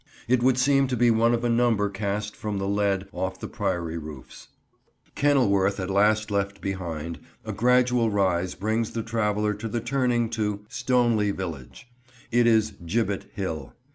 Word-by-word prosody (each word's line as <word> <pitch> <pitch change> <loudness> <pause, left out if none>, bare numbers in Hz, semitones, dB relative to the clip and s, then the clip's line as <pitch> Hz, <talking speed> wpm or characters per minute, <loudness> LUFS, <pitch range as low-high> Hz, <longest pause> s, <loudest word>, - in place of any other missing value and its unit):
It 125 0 +3
would 125 0 +3
seem 135 +1 +3
to 125 -1 -2
be 120 0 +4
one 115 +1 +3
of 120 - -4
a - - +2
number 115 -3 +2
cast 100 +1 -3
from 105 -2 -4
the 95 0 -2
lead 100 -1 0
off 95 -2 -4
the - - -5
Priory 85 -6 -2
roofs. 75 -4 -10 0.7
Kenilworth 100 -9 +2
at 95 0 -3
last 105 +2 +2
left 100 -1 -1
behind, 85 -4 -4 0.3
a - - -4
gradual 125 0 +3
rise 95 -3 0
brings 110 +3 -1
the 115 - -2
traveller 105 -2 0
to 105 +2 -5
the 115 +2 -2
turning 120 -1 0
to 105 -2 -2
Stoneleigh 120 -5 +1
village. 85 - -7 0.4
It 120 0 +4
is 110 -2 +3
"Gibbet 100 +3 -1
Hill." 80 -8 -4
105 Hz, 165 wpm, -25 LUFS, 95-120 Hz, 0.7 s, be